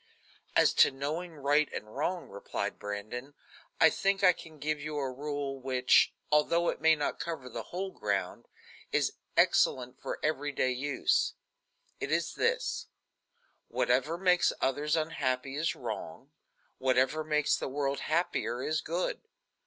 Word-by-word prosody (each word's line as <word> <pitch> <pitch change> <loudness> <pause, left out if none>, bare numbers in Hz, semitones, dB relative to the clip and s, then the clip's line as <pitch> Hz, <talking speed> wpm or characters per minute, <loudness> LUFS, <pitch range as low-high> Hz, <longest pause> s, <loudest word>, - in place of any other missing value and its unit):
"As - - +5
to - - +8
knowing 155 +6 -4
right 145 +1 +2
and 105 0 -7
wrong," 175 +6 -2
replied 100 - -4
Brandon, 110 +7 -6 0.4
"I 160 - +7
think 195 0 0
I 180 -1 +7
can 160 -2 -12
give 150 +1 -2
you 150 0 -4
a 135 -2 -1
rule 140 0 -4
which, 130 -1 +4 0.2
although 170 +3 +3
it - - -3
may 160 0 +6
not 145 -1 -2
cover 160 -6 -4
the 125 - -5
whole 190 +2 -3
ground, 100 - -2 0.4
is - - +1 0.2
excellent 125 -1 +3
for - - -4
every 145 -1 0
day 130 -1 +1
use. 135 +2 +1 0.6
It 140 - -3
is 165 0 0
this: 475 +2 0 0.8
Whatever 165 - +1
makes 180 -1 +4
others 145 +4 +1
unhappy 135 -4 -1
is 160 +3 0
wrong; - - -6 0.5
whatever 130 +4 +2
makes 150 -1 +2
the - - -4
world 140 0 -1
happier 155 -6 -1
is 155 0 0
good. 170 +3 -2
145 Hz, 145 wpm, -30 LUFS, 130-160 Hz, 0.8 s, to